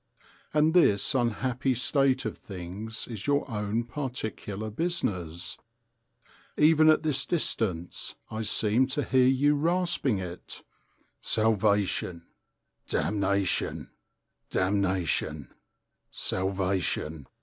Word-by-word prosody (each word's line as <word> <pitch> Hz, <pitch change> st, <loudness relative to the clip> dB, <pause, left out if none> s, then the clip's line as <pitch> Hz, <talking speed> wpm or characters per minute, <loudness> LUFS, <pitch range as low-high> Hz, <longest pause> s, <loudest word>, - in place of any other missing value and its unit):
And 155 Hz, +1 st, +3 dB
this 140 Hz, -, +4 dB
unhappy 125 Hz, +1 st, 0 dB
state 135 Hz, +1 st, +2 dB
of 110 Hz, -, -3 dB
things 100 Hz, +4 st, -7 dB
is 110 Hz, -2 st, -6 dB
your 145 Hz, 0 st, +2 dB
own 105 Hz, -1 st, -1 dB
particular 110 Hz, -5 st, -5 dB
business. 95 Hz, -, -2 dB, 1.0 s
Even 155 Hz, +1 st, +6 dB
at 155 Hz, -, +4 dB
this 140 Hz, -4 st, +1 dB
distance 110 Hz, -, -2 dB, 0.2 s
I 110 Hz, 0 st, -3 dB
seem 110 Hz, +3 st, +2 dB
to 140 Hz, +2 st, -1 dB
hear 130 Hz, -1 st, +3 dB
you 135 Hz, +3 st, +4 dB
rasping 165 Hz, -, +1 dB
it: 90 Hz, -2 st, -7 dB, 0.6 s
"Salvation, 105 Hz, -5 st, +1 dB, 0.6 s
damnation, 100 Hz, -2 st, 0 dB, 0.6 s
damnation, 95 Hz, -3 st, 0 dB, 0.6 s
salvation!" 95 Hz, -5 st, -1 dB
110 Hz, 90 wpm, -28 LUFS, 95-135 Hz, 1.0 s, Even